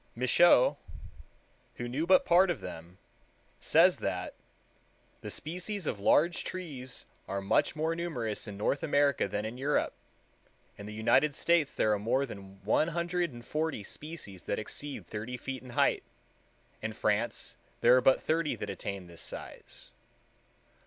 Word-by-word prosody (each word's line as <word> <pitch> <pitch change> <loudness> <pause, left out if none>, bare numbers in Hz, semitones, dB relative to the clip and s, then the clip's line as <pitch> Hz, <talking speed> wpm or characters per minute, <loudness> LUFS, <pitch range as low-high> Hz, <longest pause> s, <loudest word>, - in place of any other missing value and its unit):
Michaux, 125 +3 +5 1.0
who 120 - -4
knew 145 +7 -2
but 185 0 +6
part 180 +2 +5
of 170 - -1
them, 85 +3 -9 0.6
says - - +5
that - - -3 0.9
"the - - -6
species 180 +4 -4
of 105 - -2
large 170 - +3
trees 140 -9 -6 0.2
are 100 - -2
much 95 +9 +1
more 160 +2 0
numerous 125 -12 -3
in 100 -1 -7
North 105 +7 0
America 145 -6 +2
than 105 +2 -3
in 115 +3 -6
Europe; 145 +2 +1 0.8
in 100 - -9
the - - -6
United 135 +6 +3
States 170 -4 +2
there 110 - +3
are 105 - 0
more 125 +6 +1
than 95 -4 -11
one 110 +9 +3
hundred 170 0 -1
and 120 -1 -11
forty 155 -7 -2
species 145 - -7
that - - -2
exceed 140 +6 -5
thirty 110 +3 -5
feet 130 +1 -5
in 130 - -12
height; 120 - +2 0.8
in - - -3
France - - -1 0.3
there 120 +2 +7
are 130 - +5
but 130 +1 +4
thirty 160 -1 +1
that - - -5
attain 100 -2 -5
this 85 -1 -10
size." - - -8
130 Hz, 150 wpm, -30 LUFS, 105-160 Hz, 1.0 s, there